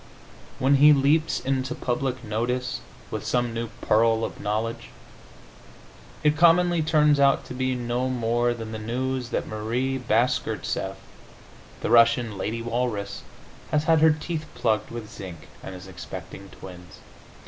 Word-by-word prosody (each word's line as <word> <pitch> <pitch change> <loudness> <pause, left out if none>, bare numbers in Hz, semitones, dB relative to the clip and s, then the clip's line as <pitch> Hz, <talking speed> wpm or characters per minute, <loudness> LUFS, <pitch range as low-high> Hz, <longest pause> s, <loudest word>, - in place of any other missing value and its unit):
When 135 +2 +3
he 150 +2 +8
leaps 145 +3 +2
into 135 0 -1
public 130 0 -2
notice 120 +3 -2 0.3
with - - -4
some 120 -2 0
new 115 0 -3
pearl 115 +1 +3
of - - -8
knowledge, 110 +3 -2 1.4
it 150 0 +4
commonly 170 +1 +4
turns 150 -2 +3
out 140 0 +4
to - - -8
be 130 0 -1
no 120 +1 -1
more 120 -1 +1
than 115 -1 -7
the 110 - -5
news 125 +3 -2
that - - -2
Marie 120 +5 -2
Bashkirtseff, 120 0 0 0.9
the - - -2
Russian 115 -1 +4
lady 110 +4 -3
walrus, 115 -3 -2 0.5
has 150 0 +1
had 160 -1 +3
her 160 - +7
teeth 155 0 -2
plugged 110 -3 0
with 115 -2 -7
zinc 90 -8 -10
and 95 - -8
is 90 0 -10
expecting 95 +1 -9
twins. 90 -4 -12
120 Hz, 140 wpm, -25 LUFS, 110-135 Hz, 1.4 s, he